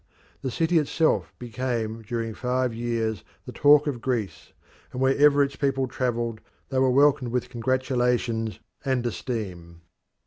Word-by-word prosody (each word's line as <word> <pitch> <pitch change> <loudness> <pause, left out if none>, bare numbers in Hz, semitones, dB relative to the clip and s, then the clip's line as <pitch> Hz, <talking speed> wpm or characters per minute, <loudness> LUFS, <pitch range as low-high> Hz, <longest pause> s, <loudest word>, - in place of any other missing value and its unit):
The 135 - -2
city 165 +6 +2
itself 155 +2 +1
became 120 -2 -3
during 115 0 -3
five 125 +1 -1
years 115 -3 -2 0.2
the - - -7
talk 145 +1 +5
of 135 -6 -3
Greece, 110 - -3 0.4
and 125 - -6
wherever 140 +2 +5
its 140 0 -3
people 135 -2 0
travelled 120 -3 -2 0.3
they 130 - 0
were 130 0 +4
welcomed 135 -2 +3
with 125 0 -1
congratulations 125 -2 0 0.2
and 130 -3 0
esteem. 95 -9 -5
125 Hz, 135 wpm, -25 LUFS, 115-135 Hz, 0.4 s, talk